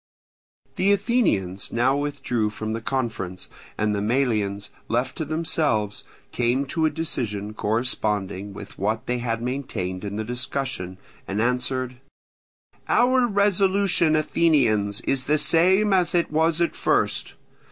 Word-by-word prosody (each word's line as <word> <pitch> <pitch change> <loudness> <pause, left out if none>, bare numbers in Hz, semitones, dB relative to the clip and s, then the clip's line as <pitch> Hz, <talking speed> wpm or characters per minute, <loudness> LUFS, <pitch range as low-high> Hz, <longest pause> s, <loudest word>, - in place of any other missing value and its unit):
The 195 +2 +3
Athenians 200 - 0
now 125 +3 +2
withdrew 140 -6 -1
from 110 +1 -4
the 115 - -3
conference; 110 -8 -3 0.3
and 105 0 +1
the 100 - -1
Melians, 105 -4 0 0.2
left 125 +3 -1
to 160 - -2
themselves, 150 -9 -1 0.3
came 125 +3 +1
to 160 -2 +2
a - - +2
decision 115 -10 -3
corresponding 105 -3 -1
with 100 +1 -10
what 110 +3 -1
they 125 0 -1
had 115 -1 -2
maintained 105 -8 -3
in 100 0 -4
the 110 - -2
discussion, 125 -5 -3 0.3
and 100 +2 -2
answered: 125 +1 -1 0.9
"Our 250 0 +4
resolution, 195 -5 +3
Athenians, 125 -11 +2
is 135 -1 -1
the 150 +1 +3
same 190 +7 +4
as 180 -2 +2
it 170 -3 +1
was 160 +2 +2
at 170 - +1
first. - - 0
125 Hz, 130 wpm, -24 LUFS, 105-160 Hz, 0.9 s, Our